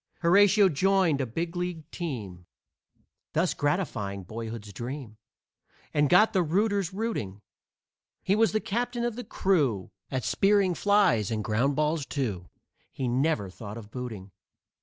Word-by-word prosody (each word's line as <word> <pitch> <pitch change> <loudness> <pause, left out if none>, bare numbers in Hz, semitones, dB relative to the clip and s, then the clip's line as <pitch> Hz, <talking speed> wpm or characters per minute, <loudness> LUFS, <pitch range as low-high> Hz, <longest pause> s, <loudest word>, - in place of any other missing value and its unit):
Horatio 200 +3 +6
joined 185 -2 +2
a 130 - -2
big 165 +9 -4
league 175 -3 -4
team, 105 - -6 0.9
Thus 165 +3 +2
gratifying 115 - -2
boyhood's 110 +1 -7
dream, 120 0 -6 0.8
And 145 -1 +3
got 210 +5 +5
the 190 - +3
rooters 200 +2 +1
rooting; 185 - -4 0.8
He 190 - +2
was 225 +1 +3
the 215 - 0
captain 240 +2 -2
of 240 -2 -2
the 245 - -5
crew 140 - 0 0.2
At 130 -2 -2
spearing 195 - +3
flies 190 - +3
and 110 -2 -2
ground 120 +7 +1
balls, 150 -1 0
too; 105 -12 -3 0.4
He 130 - -3
never 125 -3 +1
thought 105 +2 -8
of 110 -2 -11
booting. 110 -7 -7
150 Hz, 140 wpm, -27 LUFS, -, 0.9 s, Horatio